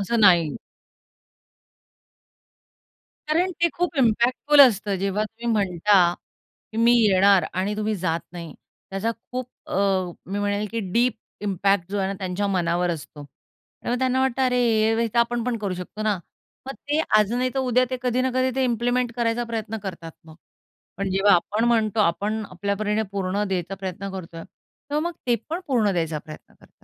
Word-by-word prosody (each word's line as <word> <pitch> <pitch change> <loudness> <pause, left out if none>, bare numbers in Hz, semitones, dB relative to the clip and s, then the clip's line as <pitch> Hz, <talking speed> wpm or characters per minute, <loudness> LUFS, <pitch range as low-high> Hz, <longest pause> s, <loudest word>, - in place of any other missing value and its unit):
असं 220 +4 -1
नाही. 175 -7 +4 2.7
कारण 345 +4 +2
ते 340 - +5
खूप 350 -2 -2
इम्पॅक्टफुल 250 +4 +3
असतं, 210 -6 +5
जेव्हा 195 +2 -1
तुम्ही 225 +2 -9
म्हणता, 185 -3 +3 0.6
की 220 - -7
मी 230 +1 +5
येणार 195 -2 +5
आणि 190 +3 -1
तुम्ही 215 0 -1
जात 170 -3 -1
नाही. 170 -3 -8 0.4
त्याचा 195 +4 -1 0.2
खूप 250 0 -3 0.2
अ, - - -3 0.5
मी 200 +2 -3
म्हणेल 205 +1 -1
की 230 - -2
डीप 240 +2 +2 0.3
इम्पॅक्ट 195 -2 0
जो 205 - -1
आहे 190 -1 0
ना, 195 - -2
त्यांच्या 190 +1 -2
मनावर 175 -2 0
असतो. 150 -2 -8
त्यामुळे 235 - -8
त्यांना 260 0 +1
वाटतं, 265 0 0
"अरे, 230 -3 +2
हे 230 - +1
तर 235 +2 0
आपण 235 0 +1
पण 245 -1 -1
करू 200 -4 -3
शकतो 180 +4 -7
ना." 215 -1 +2 0.5
मग 270 - -4 0.2
ते 300 +1 +2 0.2
आज 210 0 +2
नाही 250 +1 +1
तर 270 - 0
उद्या, 255 -1 +2
ते 255 - -2
कधी 250 0 +1
ना 260 0 0
कधी 255 0 +2
ते 265 - +1
इम्प्लिमेंट 245 0 0
करायचा 235 0 0
प्रयत्न 225 -1 -4
करतात 170 -4 -6
मग. 160 -1 -14 0.6
पण 195 +1 -2
जेव्हा 195 +1 +4
आपण 205 +6 0
म्हणतो, 225 -2 +2
आपण 210 +4 0
आपल्या 200 +2 -2
परीने 210 +1 0
पूर्ण 200 +1 -1
द्यायचा 185 0 -2
प्रयत्न 195 0 -6
करतोय. 165 -3 -8
तेव्हा 295 +1 -7
मग - - -6
ते 240 - +3
पण 335 +3 -3
पूर्ण 230 -7 +2
द्यायचा 165 -3 -1
प्रयत्न 155 +1 -13
करतात. - - -22
210 Hz, 170 wpm, -24 LUFS, 190-240 Hz, 2.7 s, ते